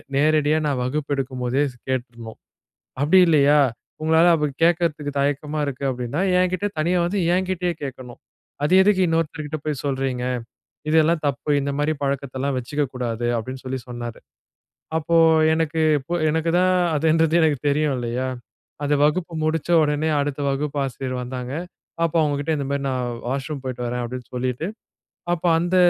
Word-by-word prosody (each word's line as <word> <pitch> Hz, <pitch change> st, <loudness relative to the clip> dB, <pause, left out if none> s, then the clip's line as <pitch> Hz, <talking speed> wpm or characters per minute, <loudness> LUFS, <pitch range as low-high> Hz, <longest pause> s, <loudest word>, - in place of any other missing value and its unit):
நேரடியா, 150 Hz, +1 st, +3 dB
நான் 140 Hz, -3 st, 0 dB
வகுப்பு 145 Hz, +3 st, -2 dB
எடுக்கும்போதே 130 Hz, 0 st, -1 dB
ஸ் 125 Hz, -, -20 dB
கேட்டுறணும். 120 Hz, -3 st, -4 dB, 0.6 s
அப்பிடி 155 Hz, +7 st, +5 dB
இல்லையா, 150 Hz, -1 st, +5 dB, 0.4 s
உங்களால 160 Hz, +2 st, +4 dB
அப்பிடி 150 Hz, -3 st, 0 dB
கேட்கறதுக்கு 165 Hz, -4 st, +1 dB
தயக்கமா 145 Hz, +2 st, -1 dB
இருக்கு 140 Hz, 0 st, -4 dB
அப்பிடின்னா, 125 Hz, +4 st, -3 dB, 0.2 s
என்கிட்ட 185 Hz, +2 st, +1 dB
தனியா 175 Hz, +4 st, +2 dB
வந்து, 200 Hz, +3 st, -1 dB, 0.2 s
என்கிட்டயே 185 Hz, -1 st, 0 dB
கேட்கணும். 125 Hz, -2 st, -8 dB, 0.5 s
அது 150 Hz, -, 0 dB
எதுக்கு 200 Hz, -1 st, +3 dB
இன்னொருத்தர்கிட்ட 160 Hz, -2 st, -2 dB
போய் 150 Hz, -4 st, -2 dB
சொல்றீங்க? 135 Hz, -2 st, -1 dB, 0.7 s
இதெல்லாம் 160 Hz, +1 st, +3 dB
தப்பு. 140 Hz, +1 st, -2 dB
இந்த 140 Hz, 0 st, -2 dB
மாரி 150 Hz, +2 st, +1 dB
பழக்கத்தெல்லாம் 135 Hz, 0 st, -2 dB
வச்சுக்க 145 Hz, +4 st, -2 dB
கூடாது" 120 Hz, -2 st, -2 dB
அப்டின்னு 130 Hz, +3 st, -6 dB
சொல்லி 130 Hz, 0 st, -3 dB
சொன்னாரு. 120 Hz, -1 st, -6 dB, 0.8 s
அப்போ, 165 Hz, +1 st, 0 dB, 0.4 s
எனக்கு 160 Hz, 0 st, -1 dB, 0.2 s
இப்போ, 170 Hz, +6 st, -5 dB, 0.2 s
எனக்கு 160 Hz, +1 st, 0 dB
தான் 185 Hz, 0 st, +3 dB, 0.2 s
அதுன்றது, 160 Hz, +1 st, +2 dB
எனக்கு 155 Hz, -3 st, +2 dB
தெரியும், 145 Hz, 0 st, +1 dB
இல்லையா. 120 Hz, +2 st, -2 dB, 0.6 s
அந்த 145 Hz, -, +2 dB
வகுப்பு 165 Hz, +3 st, 0 dB
முடிச்ச 160 Hz, +1 st, -1 dB
உடனே, 150 Hz, +1 st, +1 dB
அடுத்த 145 Hz, 0 st, -2 dB
வகுப்பு 145 Hz, +1 st, -2 dB
ஆசிரியர் 130 Hz, -1 st, -4 dB
வந்தாங்க. 125 Hz, +1 st, -5 dB, 0.5 s
அப்போ, 165 Hz, 0 st, 0 dB
அவங்க 145 Hz, -2 st, 0 dB
கிட்ட 160 Hz, +2 st, -1 dB
இந்த 140 Hz, -, -3 dB
மாரி, 140 Hz, 0 st, -1 dB
நான் 125 Hz, -1 st, -1 dB, 0.2 s
வாஷ்ரூம் 135 Hz, +2 st, -3 dB
போய்ட்டு 125 Hz, -2 st, -4 dB
வரேன், 120 Hz, 0 st, -2 dB
அப்டின்னு 125 Hz, +1 st, -7 dB
சொல்லிட்டு, 125 Hz, +4 st, -2 dB, 0.7 s
அப்போ, 175 Hz, 0 st, -1 dB
அந்த 175 Hz, +2 st, 0 dB
145 Hz, 150 wpm, -22 LUFS, 130-160 Hz, 0.8 s, அப்பிடி